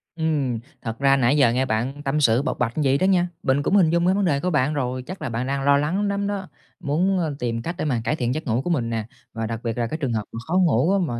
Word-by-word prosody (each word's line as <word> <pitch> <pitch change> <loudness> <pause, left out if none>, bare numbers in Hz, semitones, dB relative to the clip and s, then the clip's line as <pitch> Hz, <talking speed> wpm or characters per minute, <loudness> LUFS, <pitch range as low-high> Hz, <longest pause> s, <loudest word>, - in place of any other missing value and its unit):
Ừm, 145 -8 0 0.2
thật 115 0 -5
ra 135 0 +4
nãy 130 +3 +3
giờ 125 -5 +5
nghe 130 +2 +1
bạn 125 +6 -2
tâm 150 +2 0
sự, 120 0 +4
bộc 150 - -3
bạch 115 -1 0
vậy 135 0 +3
đó 185 - +1
nha, 180 -2 +3 0.2
mình 140 +1 +2
cũng 200 - +1
hình 175 -5 +5
dung 170 +1 +2
ra 185 - +4
vấn 200 -1 +1
đề 140 -4 +2
của 180 - -1
bạn 150 -2 +1
rồi, 130 -2 -2
chắc 185 +6 -8
là - - -3
bạn 120 +3 -3
đang 135 0 -1
lo 140 0 +5
lắng 180 +8 0
lắm 200 0 -1
đó, 200 -2 -3 0.3
muốn, 180 +7 +1
ơ, 155 -4 -2
tìm 115 -1 -2
cách 170 +7 -4
để - - -2
mà 125 -6 0
cải 150 - 0
thiện 125 -3 -1
giấc 155 -2 -5
ngủ 120 +3 +1
của 175 - -4
mình 125 -9 0
nè, 115 -2 -2 0.3
và 115 -1 -3
đặc 115 0 -4
biệt 115 0 -3
là 120 -1 0
cái 155 - -4
trường 135 -7 -2
hợp 110 -1 -1
mà - - -7
khó 170 - -3
ngủ 165 -2 +3
á - - +3
mà 120 -2 -3
140 Hz, 305 wpm, -23 LUFS, 120-170 Hz, 0.3 s, giờ